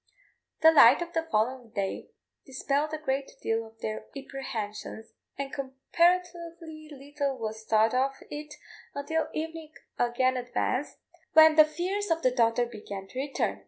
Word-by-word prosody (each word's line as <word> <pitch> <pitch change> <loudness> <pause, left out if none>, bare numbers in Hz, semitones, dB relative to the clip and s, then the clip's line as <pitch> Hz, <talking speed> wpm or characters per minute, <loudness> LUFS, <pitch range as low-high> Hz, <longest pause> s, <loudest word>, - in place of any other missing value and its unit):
The 320 - +9
light 285 0 +7
of 345 0 -11
the 325 0 -1
following 240 +2 0
day 200 -4 -4 0.3
dispelled 280 +2 -1
a 310 - -2
great 275 -2 -3
deal 225 0 -1
of 225 0 -21
their 215 0 -4
apprehensions, 240 -6 -6 0.2
and 275 -1 -5
comparatively 335 +3 -1
little 280 -1 -4
was 220 -1 -5
thought 220 +1 +3
of 270 +2 +1 0.2
it 300 0 -7 0.4
until 320 +3 -1
evening 320 0 -5 0.3
again 255 +2 +2
advanced, 250 +2 -2 0.4
when 315 0 +8
the 310 -1 +8
fears 365 +7 -3
of 330 0 0
the 255 - +4
daughter 240 -1 +2
began 205 -4 -8
to 255 - -6
return. 275 0 -2
275 Hz, 145 wpm, -28 LUFS, 240-315 Hz, 0.4 s, The